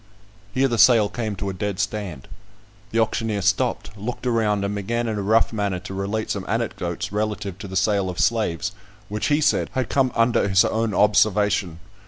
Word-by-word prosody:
Here 130 +5 +2
the 120 -3 -1
sale 115 -4 +6
came 110 -4 -3
to 100 +1 -3
a - - -7
dead 100 +1 -3
stand. 100 -9 -3 0.6
The 115 - -3
auctioneer 110 -2 0
stopped, 105 +2 0
looked 110 +5 -6
around, 105 -4 +1
and 100 - -2
began 115 +4 -2
in 110 - -1
a 105 - -2
rough 110 +4 +2
manner 100 -4 -1
to 95 - -8
relate 100 +3 -2
some 100 - -2
anecdotes 105 -3 -2
relative 105 -3 -3
to - - -7
the 95 - -7
sale 100 0 +1
of 90 - -6
slaves, 110 -9 +1 0.4
which, 105 +1 -2
he 150 +1 +2
said, - - +2
had 130 -3 -1
come 130 -2 +2
under 115 -2 +3
his 95 0 +5
own 110 -1 -1
observation. 105 -4 +2
105 Hz, 190 wpm, -23 LUFS, 100-115 Hz, 0.6 s, sale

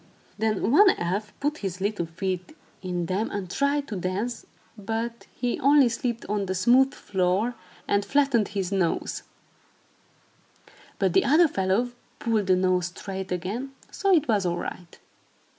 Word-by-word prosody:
Then 220 0 0
one 395 +8 +7
elf 195 +5 -2
put 295 +2 -1
his 190 -2 -4
little 200 -3 -1
feet 185 - -4 0.2
in 180 -2 -2
them 190 +6 -1
and 190 -3 -5
tried 280 +3 0
to 215 - -4
dance, 195 +6 -3 0.3
but 225 +3 -4
he 245 -1 -1
only 280 -1 +5
slipped 235 0 -3
on 200 -1 -1
the 185 - -1
smooth 250 +8 +4
floor 190 +5 0 0.3
and 200 0 +2
flattened 275 -5 +2
his 195 -3 -3
nose; 185 -4 0 1.8
but - - +1
the 385 - +5
other 320 +4 +5
fellow 200 +1 0 0.3
pulled 220 -4 0
the 185 - +5
nose 185 -1 +2
straight 190 +1 -6
again, 210 +10 -3 0.2
so 395 - 0
it 315 -5 +4
was 210 -4 +2
all 175 -1 0
right. 175 0 -7
205 Hz, 150 wpm, -26 LUFS, 185-245 Hz, 1.8 s, one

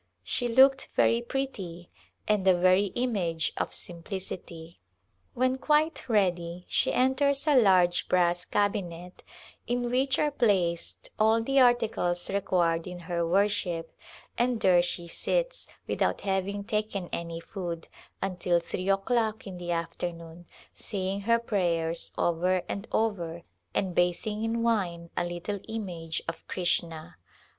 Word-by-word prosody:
She 240 - -1
looked 265 +3 +5
very 230 +1 +4
pretty 200 -10 -5 0.4
and 210 -2 +2
the 190 -1 +5
very 185 +3 +4
image 190 -10 0
of - - -2
simplicity. 170 -2 -7 0.6
When 255 +1 +1
quite 300 0 +1
ready 180 -4 0
she - - +1
enters 275 +2 +2
a 300 -2 +4
large 185 -7 +4
brass 175 -1 +3
cabinet 180 -4 -2 0.4
in 245 0 -1
which 265 +1 +2
are 300 - +2
placed 185 -10 0
all 220 +1 +4
the 270 +3 +2
articles 225 -9 +2
required 175 -4 +1
in 180 0 -6
her 170 -1 -1
wor 195 +4 +4
ship, 175 -6 -3 0.4
and 240 -1 +2
there 180 -3 +5
she 175 0 -4
sits, - - -1 0.2
without - - 0
having 195 +1 -1
taken 210 -3 -2
any 170 0 -4
food, 170 -2 -6 0.4
until 180 -2 +1
three 185 +2 -4
o'clock 220 +2 +1
in 185 -3 -7
the 175 0 -6
afternoon, 170 0 -4 0.3
saying 195 -1 -3
her 230 +3 +3
prayers 170 -7 -1
over 180 +2 +1
and 200 +3 -5
over 170 -7 -1 0.3
and 185 -2 0
bathing 180 +5 0
in 230 +1 0
wine 175 -7 0
a 175 - +1
little 175 +4 -4
image 175 -8 -4
of 165 - -5
Krishna. 170 -3 -2
190 Hz, 135 wpm, -28 LUFS, 175-225 Hz, 0.6 s, looked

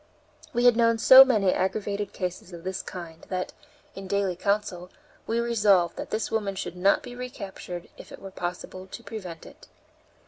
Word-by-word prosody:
We 240 0 +1
had 245 -2 +7
known 230 0 +3
so 260 +4 +10
many 215 -8 +2
aggravated 200 +1 -2
cases 180 0 -5
of 170 -1 -9
this 190 0 -3
kind 170 -3 -9
that, 185 -1 -3 0.4
in 195 0 -8
daily 200 -2 0
counsel, 185 -2 -1 0.4
we 230 +1 0
resolved 210 -7 +3
that - - -6
this 215 0 -2
woman 205 -3 -1
should 190 - -5
not 195 +3 +3
be 245 - -8
recaptured 200 -8 -7
if - - -12
it - - -9
were 195 - -9
possible 185 +1 -6
to 235 - -10
prevent 185 -9 -8
it. - - -15
195 Hz, 175 wpm, -26 LUFS, 180-225 Hz, 0.4 s, so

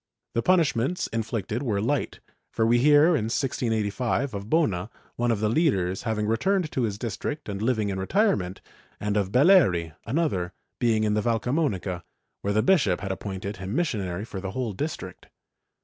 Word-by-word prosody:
The 115 - +1
punishments 165 -1 +2
in 115 - -2
flicted 110 0 -3
were 110 -8 0
light, 135 +6 -1 0.3
for 110 - +1
we 120 +1 +4
hear, 145 +4 +6
in 110 - 0
1685, 115 +1 -1
of 100 +1 -6
Bona, 110 - +1 0.3
one 120 0 0
of 110 -3 0
the 110 - +2
leaders, 100 - +1
having 110 -2 -1
returned 160 - +1
to 130 - -1
his 105 -4 -1
district 120 +6 -4
and 100 -1 -4
living 110 -3 +1
in 95 -1 -3
retirement, 95 - +1 0.4
and 105 0 -1
of 100 -2 0
Belleri, 125 - +4
another, 115 - 0 0.3
being 115 -3 +2
in 105 -1 +1
the 105 - +1
Valcamonica, 115 - -1 0.4
where 100 - -1
the 110 +1 +2
bishop 125 - +3
had 100 -1 -3
appointed 95 +1 -5
him 95 +4 -5
missionary 105 - -1
for 100 -4 -7
the 95 - -4
whole 125 -5 -2
district. 95 - -5
110 Hz, 170 wpm, -26 LUFS, 100-135 Hz, 0.4 s, hear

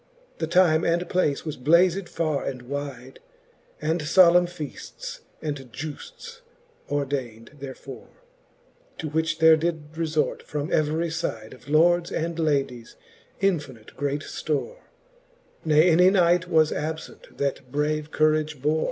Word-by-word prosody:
The 160 - -1
time 170 -2 +4
and 170 +1 +1
place 160 -6 0
was 155 - -4
blazed 175 +6 +3
farre 155 -4 -1
and 130 -2 -5
wide; 135 -1 -6 0.6
And 160 +2 -1
fblemne 175 +2 +5
feafts 160 -5 -8 0.2
and 140 -5 -5
giufts 475 - -8 0.5
ordaind 135 -6 -3
therefore. 135 -1 -9 0.9
To 155 - -4
which 160 +2 0
there 160 0 +7
did 160 -2 -3
refort 160 -2 -1
from 150 +2 -4
every 160 +2 +1
fide 115 -10 -4
Of 130 +2 -15
lords 170 +3 +3
and 165 +1 -2
ladies 135 -7 -1 0.5
infinite 150 - -2
great 145 0 -2
ftore 155 - -3
j - - -25 0.8
Ne 155 +2 +5
any 180 +3 +6
knight 180 -2 +3
was 160 -2 +4
abfent, 160 +2 -6
that 135 -2 -3
brave 150 +1 -1
courage 155 -1 +1
bore. 150 +4 +1
155 Hz, 130 wpm, -25 LUFS, 140-170 Hz, 0.9 s, there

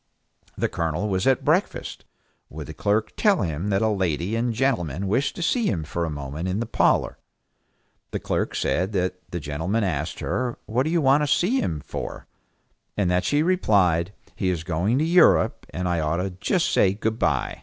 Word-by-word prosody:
The - - +1
Colonel 85 +4 -2
was 95 +1 0
at 135 -2 +2
breakfast. - - 0 0.4
Would 75 0 -7
the 80 - -8
clerk 105 +7 0
tell 205 - +3
him 85 +3 -2
that 100 +1 +1
a - - +3
lady 95 -1 -1
and 120 +1 0
gentleman 100 - -1
wished 130 +8 0
to 175 - -4
see 235 +5 +1
him 85 -6 -1
for 85 +3 -3
a - - -3
moment 75 +3 -5
in 95 +3 -1
the 115 - -1
parlor? - - +1 0.9
The - - -3
clerk - - -2
says 90 +2 0
that 90 -1 0
the 85 - -4
gentleman 80 +9 -2
asked 85 -8 -2
her, 125 -2 -2
"What 120 +5 0
do - - 0
you 170 0 +2
want 140 +1 +4
to 150 - +1
see 190 - +2
him 80 -3 -2
for?" - - -6 0.7
and 95 -4 +1
that 90 0 +1
she 145 +1 +2
replied, 100 - +2 0.2
"He 95 - -1
is 85 -3 -2
going 90 +8 0
to 155 - +2
Europe, 170 +1 +4
and 90 +1 -3
I 85 -1 0
ought 80 +1 0
to 95 +2 -2
just 105 - 0
say 95 - +4
good 110 +1 -2
by." - - 0
95 Hz, 195 wpm, -24 LUFS, 85-120 Hz, 0.9 s, want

